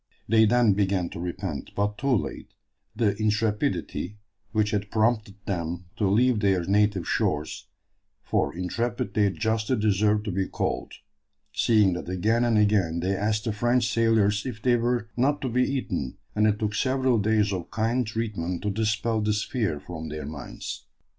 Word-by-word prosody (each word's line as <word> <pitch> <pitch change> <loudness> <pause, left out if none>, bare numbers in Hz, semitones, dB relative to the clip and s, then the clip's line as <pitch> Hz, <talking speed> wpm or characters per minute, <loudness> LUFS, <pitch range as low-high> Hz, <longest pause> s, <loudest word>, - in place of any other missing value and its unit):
They 110 +1 +5
then 120 -1 +4
began 95 -3 0
to - - -8
repent, 90 -2 -5
but 105 +1 -1
too 135 0 +2
late, 105 - -4 0.4
the 105 -4 +1
intrepidity 105 -1 -1 0.3
which 105 -1 +1
had 105 -1 -1
prompted 110 -2 +1
them 90 -1 -3
to 105 - +1
leave 120 +3 +3
their 95 -4 +2
native 100 -1 +2
shores; 75 +1 -1 0.6
for - - 0
intrepid 115 +7 -2
they 105 -2 +3
justly 110 +4 0
deserve 105 0 +2
to 105 - -3
be 95 +1 -1
called, - - -3 0.6
seeing 105 +3 +3
that 90 0 -5
again 110 +6 +1
and 115 -2 +3
again 100 -6 +2
they 95 +3 0
asked 105 +2 0
the 110 - -1
French 120 +2 +1
sailors 110 -3 +3
if 125 -4 -5
they 120 +1 +3
were 120 -1 0
not 140 +4 +2
to 130 - -1
be 125 +2 +1
eaten, 90 - -3 0.2
and 105 0 +3
it 105 -1 +2
took 105 -1 -2
several 130 0 +2
days 105 -1 +2
of 90 -3 -4
kind 115 +3 0
treatment 105 -6 -3
to 105 - 0
dispel 110 +1 0
this 105 0 +1
fear 105 - -1
from 80 0 -7
their 75 -1 -5
minds. 70 -3 -7
105 Hz, 165 wpm, -26 LUFS, 95-115 Hz, 0.6 s, They